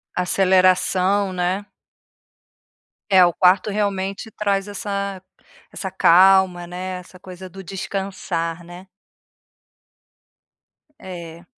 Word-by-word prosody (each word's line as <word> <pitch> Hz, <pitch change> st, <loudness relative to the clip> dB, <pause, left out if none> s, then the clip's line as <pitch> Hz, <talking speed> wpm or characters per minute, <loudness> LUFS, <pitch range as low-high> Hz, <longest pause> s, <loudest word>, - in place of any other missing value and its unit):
Aceleração, 185 Hz, +1 st, +2 dB
né. 185 Hz, +3 st, -2 dB, 1.4 s
É, 190 Hz, -3 st, +6 dB
o 175 Hz, -, +2 dB
quarto 185 Hz, +4 st, +3 dB
realmente 200 Hz, +1 st, -2 dB
traz 200 Hz, -1 st, -1 dB
essa 200 Hz, -2 st, -4 dB, 0.5 s
essa 190 Hz, -, -5 dB
calma, 185 Hz, 0 st, +4 dB
né, 180 Hz, +1 st, -6 dB
essa 180 Hz, 0 st, -15 dB
coisa 185 Hz, 0 st, -11 dB
do 190 Hz, +2 st, -11 dB
descansar, 180 Hz, -3 st, -4 dB
né. 175 Hz, +2 st, -12 dB, 2.1 s
É. 170 Hz, -2 st, -10 dB
185 Hz, 90 wpm, -21 LUFS, 180-195 Hz, 2.1 s, É